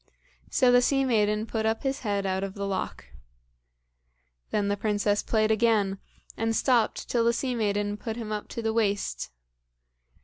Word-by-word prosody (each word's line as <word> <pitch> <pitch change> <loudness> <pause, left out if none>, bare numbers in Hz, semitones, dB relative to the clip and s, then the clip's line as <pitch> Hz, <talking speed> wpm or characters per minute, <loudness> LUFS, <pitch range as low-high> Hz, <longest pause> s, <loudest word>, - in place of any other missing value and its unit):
So 250 -1 +4
the 245 0 +6
sea 270 +2 +2
maiden 210 -3 +2
put 220 0 -2
up 220 0 0
his 270 0 -1
head 200 -3 -1
out 190 0 -1
of 195 -1 -5
the 200 -1 -3
loch. 195 - -3 1.4
Then 205 -1 0
the 200 - +1
princess 205 0 0
played 220 -1 +1
again, 215 -3 +2 0.4
and 225 0 0
stopped 240 -3 +1
till 235 -2 +1
the 235 0 +3
sea 255 +2 -1
maiden 205 -2 -1
put 220 +1 -5
him 225 -2 -6
up 210 -1 -3
to 230 - -6
the 220 0 0
waist. 205 - -1
215 Hz, 170 wpm, -27 LUFS, 205-230 Hz, 1.4 s, the